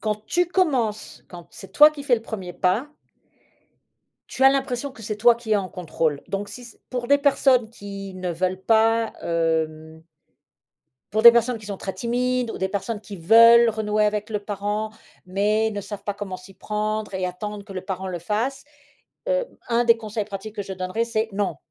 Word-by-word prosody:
Quand 215 -1 -3
tu 355 0 +1
commences, 265 - -1
quand 175 -2 -11
c'est 195 -1 -12
toi 300 +5 +8
qui 290 -2 -9
fais 260 -3 +3
le 225 - -5
1er 195 -6 -6
pas 185 - 0 1.4
tu 265 - -4
as 270 - +9
l'impression 270 0 -2
que 220 - -14
c'est 210 0 -4
toi 235 +2 +5
qui 230 -2 -4
est - - +5
en 190 -2 -2
contrôle. 160 -5 -2
Donc 200 +1 -3
si 235 +1 -11
pour 250 -1 -3
des 285 0 +5
personnes 265 -5 +3
qui 200 -3 -8
ne 185 -1 -4
veulent 185 +2 -2
pas, 225 +2 +2
hem 160 -1 -2 1.1
pour 220 - +1
des 235 - +12
personnes 235 0 +1
qui 210 - -12
sont 200 -2 -5
très 190 - -5
timides 245 +3 -1
ou - - -6
des 190 - -1
personnes 205 +2 -3
qui 205 -2 -9
veulent 230 +6 +7
renouer 215 -1 0
avec 210 0 -1
le 210 -2 -2
parent, 205 +1 -3 0.3
mais 210 +4 +1
ne 205 -1 -4
savent 200 0 -8
pas 205 0 -3
comment 195 -2 -6
s'y 185 +1 -15
prendre 210 +1 -3
et 185 -1 -2
attendre 205 +3 -6
que 200 - -11
le 185 - -4
parent 190 -1 -4
le 175 -2 -4
fasse. 230 +10 -2 0.6
Heu, - - +1 0.2
un 235 +1 +2
des 230 0 +5
conseils 215 -1 -4
pratiques 205 +1 -8
que 205 - -3
je 190 - -7
donnerais, 185 +5 -2
c'est: 225 -1 -1
«Non. 195 -6 -1
210 Hz, 195 wpm, -23 LUFS, 190-235 Hz, 1.4 s, des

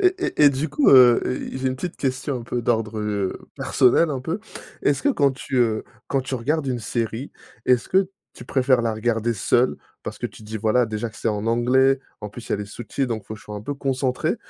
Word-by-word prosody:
Et 370 -1 +4
et 255 - +2
et - - +8
du 140 +4 -2
coup, 285 - +2
heu, 125 -3 +8 0.3
j'ai 130 0 -3
une 130 - -3
petite 175 +6 -5
question, 130 0 -2
un - - -8
peu 120 +1 -3
d'ordre, 110 -2 0
heu, 105 -2 -1 0.2
personnel, 135 +5 +3
un 135 -3 -2
peu. 165 +10 -3 0.4
Est-ce 140 - +1
que 290 - +3
quand 140 - +3
tu, 135 0 -5
heu, 115 -3 +2 0.2
quand 135 - +1
tu 130 - -4
regardes 140 +5 -1
une 125 -2 -1
série, 115 +4 -3 0.4
est-ce 125 -2 +3
que 190 0 +3 0.3
tu - - -11
préfères 130 -2 +3
la 115 -1 0
regarder 115 +1 0
seule, 120 +5 +2 0.3
parce - - -6
que - - -2
tu - - -14
te - - -13
dis: 110 - -4
«Voilà 110 +3 +2
déjà 110 +1 -3
que 105 - -16
c'est - - -1
en 105 -1 -2
anglais, 130 +4 +3 0.2
en 105 - -5
plus 115 +3 -10
il - - -15
y - - +4
a - - -1
les 105 - -4
sous-titres 120 +5 -3
donc 110 -3 -3
il - - -31
faut 110 - -6
que 110 - -13
je - - -17
sois 105 - -7
un - - -6
peu 145 +5 -4
concentrée»? 135 -2 -1
125 Hz, 255 wpm, -23 LUFS, 110-135 Hz, 0.4 s, et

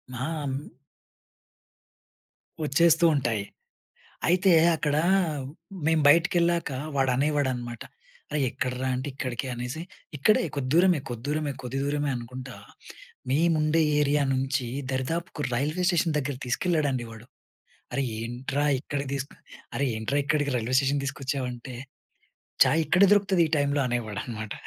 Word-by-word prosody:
ఆహా! 125 - -3 0.2
హ్మ్. 140 +1 -4 2.0
వచ్చేస్తూ 165 +3 +4
ఉంటాయి. 115 -7 0 0.8
అయితే 185 +2 +4 0.2
అక్కడ 150 -2 0 0.9
మేము 160 -1 +3
బయటికెళ్ళాక 170 +1 +3 0.3
వాడనేవాడనమాట, 130 -3 0 0.5
"అరే! 150 - -1
ఎక్కడరా" 125 +2 -2
అంటే, 130 +3 -4
"ఇక్కడికి" 130 -1 -4
అనేసి, 125 +6 -5 0.4
"ఇక్కడే 215 +10 +4
కొద్ది 130 -2 -2
దూరమే, 180 -2 +5
కొద్ది 120 0 -6
దూరమే, 150 -1 -1
కొద్ది 125 +2 -4
దూరమే" 145 +1 0
అనుకుంటా 125 +1 -7 0.8
మేముండే 155 +1 +3 0.2
ఏరియా 145 0 +2
నుంచి 130 -1 -1 0.2
దరిదాపుకు 155 +5 -3
రైల్వే 150 +8 -1
స్టేషన్ 165 -3 +1
దగ్గరకి 140 -2 -3
తీసుకెళ్ళాడండి 140 -2 0
వాడు. 115 +1 -12 0.7
"అరె! 140 - 0 0.2
ఏంట్రా 130 +5 -2
ఇక్కడికి 140 0 -4
తీసుకు 140 +1 -5 0.4
అరె! 140 - +1
ఏంట్రా 130 +6 -1
ఇక్కడికి 145 -1 +1
రైల్వే 120 +3 -1
స్టేషన్‌కి 140 +1 0
తీసుకొచ్చావంటే," 130 -2 -4 0.9
"ఛాయ్ 145 +5 +3
ఇక్కడే 185 +4 +5
దొరుకుతది 195 -3 +3
ఈ - - -12
టైంలో" 140 0 +1
అనేవాడనమాట. 110 -2 -4
140 Hz, 115 wpm, -26 LUFS, 125-155 Hz, 2.0 s, దూరమే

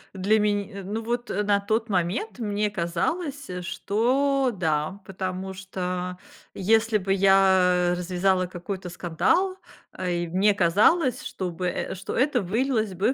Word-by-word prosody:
Для 200 +3 +2
мен 205 -1 0
э. 200 -2 -8
Ну, 210 +4 -3
вот, 240 +1 -3
э, 205 - 0
на 205 -1 +2
тот 220 +3 -1
момент 190 - -1
мне 210 -2 -1
казалось, 265 - -2
что 255 +8 +1
да, 160 0 -1
потому 190 0 -4
что, 180 -1 -4 0.4
если 220 +2 +2
бы 195 0 0
я 190 -2 +4
развязала 185 +1 +1
какой-то 180 +1 -6
скандал, 180 - 0 0.4
эй 175 -2 -1
мне 195 +4 +3
казалось, 215 - +3
что 185 -2 -4
бы 180 +1 -3
э, 180 - -3
что 190 +1 -6
это 260 -1 +2
вылилось 220 0 0
бы 200 +8 +1
195 Hz, 140 wpm, -25 LUFS, 180-225 Hz, 0.4 s, я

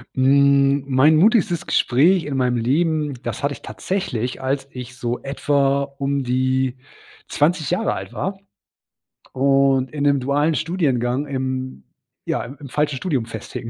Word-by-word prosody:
Mhm, 140 +1 +4
mein 140 +4 +4
mutigstes 180 -2 +3
Gespräch 160 +8 +3
in 145 -2 -4
meinem 125 -2 +1
Leben, 150 +4 0
das - - -5
hatte 145 0 0
ich - - -12
tatsächlich, 130 - -3
als 135 +1 -2
ich 125 0 -9
so 120 0 -3
etwa 140 0 +1
um 140 0 -3
die 130 0 0 0.5
20 155 0 +1
Jahre 205 +6 0
alt - - -7
war 190 +1 -4 1.0
und 135 -1 +2
in 150 - -5
'nem 140 -1 +3
dualen 145 +4 +1
Studiengang 145 -6 -1
im 130 - -4 0.4
ja, - - -1
im 135 +4 -10
im 140 - -10
falschen 150 +1 0
Studium 135 -6 -1
festhing. 110 +1 -7
140 Hz, 145 wpm, -21 LUFS, 130-150 Hz, 1.0 s, Mhm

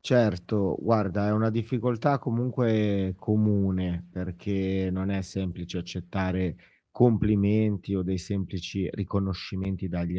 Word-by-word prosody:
Certo. 105 -5 +2
Guarda, 105 -3 +2
è - - +2
una 110 +1 +3
difficoltà 120 +4 +1
comunque 110 -6 +1
comune, 95 -5 +1
perché, 95 +1 -2
non 95 +1 -2
è 100 -1 -1
semplice 90 -1 -5
accettare 90 -1 -3 0.3
complimenti, 105 -3 +3
o 95 - 0
dei 95 0 -1
semplici 95 0 -4
riconoscimenti 95 -1 -3
dagli 85 +1 -2
95 Hz, 105 wpm, -27 LUFS, 90-105 Hz, 0.3 s, una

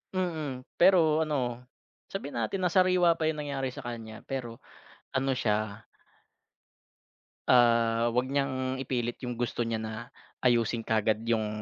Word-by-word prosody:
Mm. 155 -8 -2 0.2
Pero 170 -4 +5
ano, 125 -4 -2 0.4
sabihin 145 -10 -5
natin 185 - -2
na 180 - +2
sariwa 180 -2 +4
pa 160 - +1
yung 155 -1 -1
nangyari 140 -2 -2
sa - - -8
kanya, 115 -2 -7
pero 125 -4 -5 0.6
ano 130 0 0
siya 110 -2 -1 1.6
ah 115 -1 +4
'wag 125 +2 +1
niyang 130 -1 -1
ipilit 125 -2 -2
yung 125 -1 -4
gusto 120 0 -1
niya 115 -1 -2
na 110 0 -4 0.5
ayusin 115 -2 +2
kaagad 110 0 +1
yung 110 -2 +1
125 Hz, 135 wpm, -29 LUFS, 115-145 Hz, 1.6 s, Pero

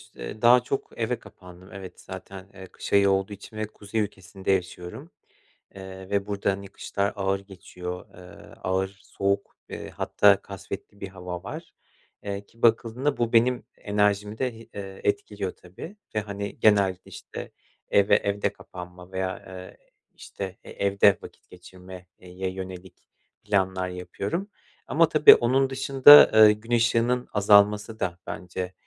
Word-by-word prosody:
eee, 105 - -8
daha 120 +1 +7
çok 135 - -3
eve 115 +1 -2
kapandım. 90 0 -15
Evet, 95 -2 -10
zaten, 95 +1 -10
eee, 95 -1 -11
kış - - -8
ayı 100 0 +5
olduğu 95 +1 0
için 100 +2 -11
ve 110 -1 -2
kuzey 105 +1 -4
ülkesinde 95 -1 -4
yaşıyorum, 90 -1 -3 0.6
eee, 95 0 -10
ve 100 -1 0
burada, 100 -1 0
hani, 100 0 -6
kışlar 100 +1 -3
ağır 95 0 0
geçiyor, 90 -2 -8
eee, 90 0 -14
ağır 95 +1 0 0.2
soğuk, 100 0 -2
eee, - - -7
hatta - - +3
kasvetli 100 - -9
bir 100 - -4
hava 90 -2 -7
var. - - -8 0.5
Eee, 100 0 -5
ki 115 - -25
bakıldığında 120 +4 +2
bu 120 0 -1
benim 120 +2 +3
enerjimi 105 +1 0
de 125 -3 -1
hi 115 - -14
eee, 95 -1 -8
etkiliyor 100 -1 -2
tabii 125 - -12 0.2
ve, - - +2
hani, 100 0 -6
genelde, 100 -4 +3
işte, - - -9 0.4
eve 100 0 +4
evde 100 0 -1
kapanma 90 0 -11
veya, 95 0 -4
ııı, 95 0 -10 0.4
işte, 95 -1 -8
e - - -13
evde 100 -1 +3
vakit - - -14
geçirme, 90 0 -13
eee, 90 - -14
ye 95 +1 -4
yönelik 95 -1 -9 0.4
planlar 95 -2 0
yapıyorum 100 - -4 0.4
ama, 165 +1 +3
tabii, 155 -1 +8
onun 130 +3 +2
dışında, 135 +2 +8
ııı, 110 -1 +9
gün 110 +3 -7
ışığının 120 +1 +2
azalması 105 +1 +4
da 90 -1 -3
bence, 90 +1 -5
100 Hz, 150 wpm, -25 LUFS, 95-110 Hz, 0.6 s, ııı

